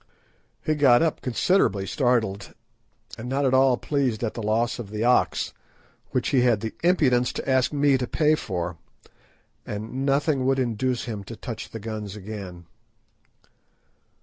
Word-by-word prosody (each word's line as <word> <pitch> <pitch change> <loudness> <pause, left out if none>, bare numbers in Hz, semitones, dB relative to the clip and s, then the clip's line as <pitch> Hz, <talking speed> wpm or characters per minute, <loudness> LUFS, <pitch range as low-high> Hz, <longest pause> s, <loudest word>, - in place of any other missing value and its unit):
He 155 - +2
got 140 -3 +5
up 160 - -1
considerably 120 - +1
startled, 110 -6 0 0.6
and 120 +2 -6
not 135 +2 0
at 130 - +2
all 130 -1 +4
pleased 130 -7 -1
at 110 - -1
the 115 - -5
loss 115 +3 0
of 110 -5 -6
the 105 +1 -3
ox, 125 +1 +2 0.6
which - - -1
he 130 - +3
had 120 -4 +3
the 110 -1 -4
impudence 130 -9 +3
to - - -5
ask 130 -1 +2
me 140 -2 +3
to 125 - -2
pay 155 +3 +2
for, 90 - -3 0.9
and 110 +6 -5
nothing 140 0 +1
would 135 0 +2
induce 125 0 -1
him 110 -4 -5
to 115 - -8
touch 115 +1 -7
the 115 - -7
guns 105 -2 -6
again. 95 -4 -8
120 Hz, 155 wpm, -25 LUFS, 110-135 Hz, 0.9 s, got